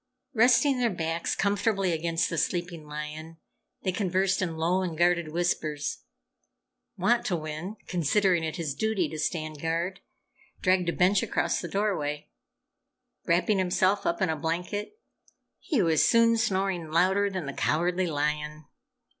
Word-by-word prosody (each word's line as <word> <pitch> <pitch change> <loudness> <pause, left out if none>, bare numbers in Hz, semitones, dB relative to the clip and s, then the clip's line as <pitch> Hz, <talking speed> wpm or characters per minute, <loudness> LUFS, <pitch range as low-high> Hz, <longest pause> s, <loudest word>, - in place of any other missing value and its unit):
Resting 250 +3 +4
their 240 -1 +2
backs 165 -3 -2
comfortably 200 -1 +1
against 165 0 0
the 165 - -2
sleeping 170 -3 -2
lion, 150 +2 -7 0.5
they 190 - +1
conversed 190 0 0
in 165 -3 -2
low 175 +4 +1
and 175 -4 -3
guarded 175 -1 +2
whispers. 155 - -2 1.0
Wantowin, 180 -4 -1
considering 180 +1 +2
it 160 -1 -3
his 165 -5 -3
duty 200 +1 0
to 155 - -6
stand 155 -2 -3
guard, 170 +3 -2 0.6
dragged 185 -2 +2
a - - +2
bench 185 +3 +3
across - - 0
the 175 - -5
doorway. 160 -7 -2 1.0
Wrapping 185 +4 +2
himself 185 +2 +1
up 170 +3 0
in 185 - +1
a 160 - 0
blanket, 180 - -3 0.6
he 265 - 0
was 160 -2 +3
soon 230 0 +5
snoring 195 -6 0
louder 190 +5 +3
than 185 -5 -4
the 140 - -5
Cowardly 175 +5 0
Lion. 150 0 -2
175 Hz, 140 wpm, -27 LUFS, 160-195 Hz, 1.0 s, soon